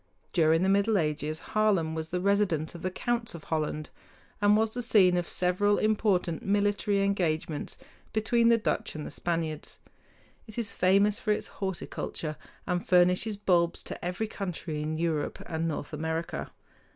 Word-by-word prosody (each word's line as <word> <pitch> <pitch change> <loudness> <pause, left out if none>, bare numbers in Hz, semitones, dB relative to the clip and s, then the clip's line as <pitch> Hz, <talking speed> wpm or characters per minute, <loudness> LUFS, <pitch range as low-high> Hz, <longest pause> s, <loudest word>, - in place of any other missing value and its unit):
During 165 -1 +4
the - - +2
Middle 200 +2 +3
Ages, 155 -1 -1
Haarlem 200 -7 +2
was 160 0 -4
the 180 - -1
residence 190 -5 +1
of 170 - -9
the 185 - -1
counts 235 +2 -2
of 160 - -9
Holland, 155 -1 -2 0.5
and 205 +1 +5
was 220 0 +1
the 245 - -1
scene 200 -6 +5
of 175 -1 0
several 185 +3 +2
important 205 -6 +1
military 205 0 +1
engagements 165 -6 -1 0.3
between 230 +2 +3
the 230 - +6
Dutch 215 - -2
and 155 - -5
the - - -6
Spaniards. 165 -3 -3 0.7
It 220 - -9
is 230 -3 -1
famous 200 +3 +3
for 215 - 0
its 210 - 0 0.2
horticulture, 170 -4 -4 0.3
and 180 -2 -1
furnishes 180 +4 +3
bulbs 175 -4 +2
to - - -8
every 180 +5 -2
country 180 -7 -4
in 155 +1 -2
Europe 160 -3 -1
and 165 0 -2
North 155 -1 -4
America. 160 +2 -3
180 Hz, 160 wpm, -29 LUFS, 160-205 Hz, 0.7 s, the